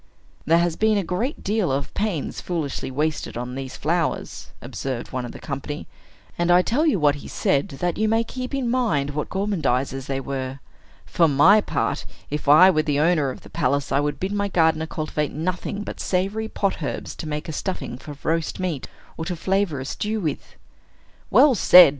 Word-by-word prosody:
"There 165 +2 +5
has 170 -1 +1
been 220 -1 +3
a 200 - +1
great 215 - -2
deal 205 -6 +1
of 135 +1 -2
pains 200 -8 -2
foolishly 160 -8 -3
wasted 150 -1 -2
on 125 +1 -4
these 135 0 -6
flowers," 165 +2 -1
observed 130 -3 -5
one 130 -1 -3
of 120 - -6
the - - -9
company; 145 +1 -5 0.5
and 175 0 +1
I 175 +1 +6
tell 290 - +1
you 285 - +3
what 145 -2 +4
he - - -9
said, 140 - +1
that 175 +6 -2
you 215 0 +2
may 225 +1 +3
keep 255 +3 -5
in 265 -3 -1
mind 225 - +1
what 150 +1 -3
gormandizers 140 -10 -1
they 135 -1 -1
were. 135 -1 -4 0.5
"For 165 - +3
my 165 +9 +6
part, - - -1 0.3
if 150 -1 -2
I 180 +6 +9
were 155 - +2
the 145 -2 0
owner 155 -3 +3
of 130 - -7
the - - -14
palace, 140 +2 0
I 135 - +3
would 145 0 -1
bid 190 +2 -2
my 200 0 0
gardener 160 -4 +2
cultivate 155 -2 -2
nothing 180 +5 -3
but - - -7
savory 195 +4 -1
pot 195 -5 -1
herbs 140 - -4
to 160 - -6
make 150 +2 -4
a - - -3
stuffing 180 -7 -4
for 145 0 -9
roast 165 +2 -1
meat, 175 -7 -2 0.3
or 160 - -4
to 180 - -2
flavor 190 -3 0
a 130 - -5
stew 215 +9 -2
with." 160 -7 -4 0.7
"Well 290 -2 +6
said!" 180 -6 +9
160 Hz, 195 wpm, -23 LUFS, 140-195 Hz, 0.7 s, I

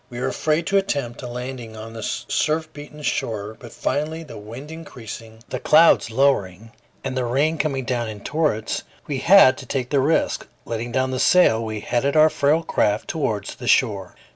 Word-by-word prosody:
We 120 - -7
were - - -1
afraid 155 +2 0
to 200 - +3
attempt 140 -11 -3
a 125 - -6
landing 120 -2 -6
on 110 +1 -8
the 115 - -7
surf 155 +8 -1
beaten 150 +1 -11
shore; 110 -5 -2
but 120 - -11
finally, 160 +3 -2
the 155 - -11
wind 115 +8 -9
increasing, 115 -8 -10
the - - -3
clouds 160 -6 +5
lowering, 115 -5 0 0.3
and 135 -1 -3
the 130 - 0
rain 145 +6 +1
coming 135 -4 -1
down 120 -3 -1
in 105 -2 -8
torrents, 150 -8 -1 0.2
we 140 -3 -3
had 165 -6 +6
to 130 - -10
take 125 -1 -3
the 140 - +3
risk. 145 +5 +1 0.2
Letting 115 +1 -4
down 130 +1 0
the 130 - -2
sail, 115 -11 +4
we 110 -1 -4
headed 130 +6 0
our 155 0 +6
frail 155 +3 +2
craft 105 -8 0
towards 110 -11 -2
the 120 - -9
shore. 100 -9 +2
130 Hz, 190 wpm, -22 LUFS, 115-150 Hz, 0.3 s, had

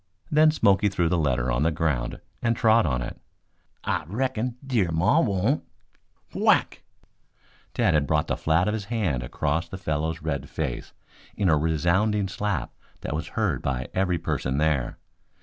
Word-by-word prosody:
Then 155 +1 +6
Smoky 105 -8 +3
threw 85 -4 0
the 90 - +2
letter 65 -5 +1
on 60 +2 0
the 80 - +3
ground 75 -6 -1 0.2
and 115 -1 +1
trod 110 -3 +4
on 60 -3 -1
it. - - -8 0.6
"I - - -1
reckon 125 +3 -2
Dear 115 -10 +1
Maw 100 - +3
won't 105 - +1 0.4
" - - -38
Whack! - - +2 0.9
Tad - - +3
had 75 -3 +2
brought 75 +1 +2
the - - -1
flat 80 +4 +1
of 105 - +1
his 110 -3 -3
hand 100 - -1
across 75 +7 -2
the 95 - -6
fellow's 80 -2 -2
red 70 -4 -3
face 75 -6 -4 0.4
in 100 -3 +2
a 80 - +5
resounding 85 +7 +1
slap 100 -2 -3 0.3
that - - -4
was 80 +2 -3
heard - - +1
by 65 -1 -2
every 95 -2 +1
person 70 -4 -2
there. 75 -5 0
85 Hz, 165 wpm, -25 LUFS, 75-105 Hz, 0.9 s, Then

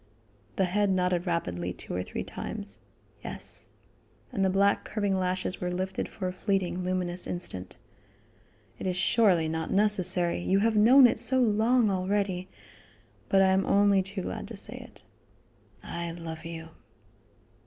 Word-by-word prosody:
The 190 - +2
head 200 +3 +1
nodded 180 -1 +1
rapidly 90 - -2
two - - -7
or 90 - -1
three - - -5
times: - - -6 0.4
"Yes." - - -3 0.6
And 195 - -1
the 190 - +3
black 200 +2 +2
curving 205 -2 -1
lashes 185 0 -1
were 180 - -1
lifted 185 +1 -3
for 185 - -4
a 180 - -3
fleeting, 185 -2 -1
luminous 180 -1 -2
instant. 95 - -5 1.0
"It - - -3
is 180 -1 -1
surely 185 -5 +3
not 160 0 -3
necessary; 190 -4 +2
you 185 +2 +1
have 220 +2 +2
known 250 +6 +7
it 240 - +3
so 260 0 +2
long 225 0 +3
already, 185 -1 -1 0.8
but 195 0 +5
I 190 - +4
am 190 +1 +3
only 200 0 +4
too 190 0 -4
glad 90 - -5
to - - -9
say - - -6
it. - - -13 0.8
I 170 0 -5
love 165 -1 -7
you." 165 -1 -7
185 Hz, 155 wpm, -28 LUFS, 175-200 Hz, 1.0 s, known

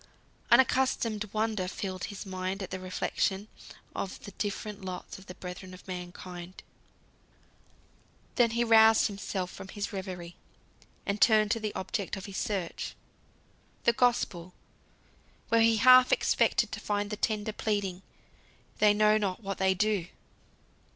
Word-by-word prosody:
Unaccustomed 235 -4 +3
wonder 215 -3 -1
filled 185 -1 -4
his 205 +2 -7
mind 190 +1 -3
at 185 - -7
the 185 - -4
reflection 190 +2 -1 0.5
of 190 - -4
the 200 - -8
different 205 0 -4
lots 185 0 -6
of 195 - -16
the 180 - -9
brethren 185 0 -8
of 185 - -16
mankind. 180 0 -8 1.7
Then 240 -2 +4
he 235 +1 +1
roused 225 -1 +6
himself 195 -2 -3
from - - -9
his 205 +2 -5
reverie, 180 -3 -6 0.7
and 200 +1 -2
turned 215 -2 +5
to 230 - +1
the 215 -1 -4
object 195 0 -3
of 195 - -7
his 195 -1 -7
search 190 -5 -3 0.9
the 235 - +4
Gospel, 195 -8 0 0.9
where 230 0 +4
he 225 0 +5
half 255 +3 +7
expected - - +2
to - - -4
find 205 0 -2
the - - -1
tender 215 0 -1
pleading: 200 -4 -2 0.8
"They 210 -1 +5
know 215 0 +4
not 200 +1 -2
what 195 -1 -4
they 190 0 +3
do." 200 -2 +1
200 Hz, 140 wpm, -29 LUFS, 185-215 Hz, 1.7 s, half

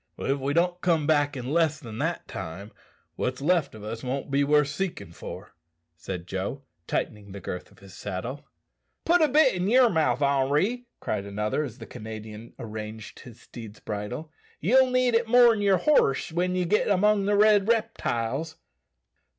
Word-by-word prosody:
"If 135 +1 -1
we 140 +2 -2
don't 175 +1 +1
come 165 -4 +2
back 145 -2 +2
in 125 +1 -5
less 160 -2 +2
than 115 -6 -8
that - - -2
time, 95 +6 -7 0.5
what's 125 0 -2
left 160 -2 +1
o' 105 - -11
us 115 +2 -5
won't 135 +2 -3
be 140 +1 +3
worth 150 0 +3
seekin' 165 - -4
for," - - -9 0.4
said 85 +1 -6
Joe, 95 +9 -4 0.2
tightening 100 -2 -3
the 100 - -7
girth 90 -1 -6
of - - -21
his 100 -1 -15
saddle. 105 +9 -5 0.6
"Put 345 +1 +4
a 310 - +5
bit 295 -1 +4
in 180 0 -1
yer 255 +4 +6
own 235 -5 +3
mouth, 145 -4 +2
Henri," 145 - +1
cried 100 -2 -2
another, 105 +8 -1
as 125 -5 -7
the - - -9
Canadian 110 +1 -9
arranged 110 -1 -7
his 120 -3 -13
steed's 110 -3 -11
bridle; 110 +9 -5 0.3
"yell 255 - +4
need 255 -1 +2
it 230 0 +2
more 240 0 +7
than 220 -2 -1
yer 200 -2 +4
horse 175 - +2
when 180 +2 0
ye 180 -1 0
git 210 +5 +2
'mong 205 0 +3
the 205 - +3
red 210 -1 +5
reptiles." 160 - -1
145 Hz, 180 wpm, -26 LUFS, -, 0.6 s, more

